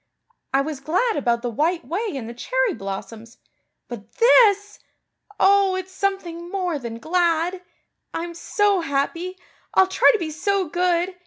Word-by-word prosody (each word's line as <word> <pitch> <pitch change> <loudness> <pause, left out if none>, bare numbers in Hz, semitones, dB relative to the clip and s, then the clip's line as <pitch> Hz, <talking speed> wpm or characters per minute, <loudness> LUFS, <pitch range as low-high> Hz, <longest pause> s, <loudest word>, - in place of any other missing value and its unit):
I 270 +1 +3
was 295 -1 -4
glad 370 - 0
about 235 -3 0
the 240 - -2
White 325 +8 0
Way 405 +4 -3
and 245 -5 -5
the 235 - -7
cherry - - 0
blossoms 220 +2 -7 0.5
but 235 -4 -10
this! 420 -4 +4 0.6
Oh, 390 -1 +4
it's 375 0 -5
something 365 -3 -3
more 360 -5 -2
than 235 -3 -6
glad. 340 +4 0 0.5
I'm 340 +1 -4
so 405 +3 +1
happy. 335 +5 -2 0.4
I'll 380 - +6
try 380 - +4
to 465 - 0
be 330 -5 -4
so 380 +4 0
good. 350 +2 0
345 Hz, 150 wpm, -22 LUFS, 280-390 Hz, 0.6 s, I'll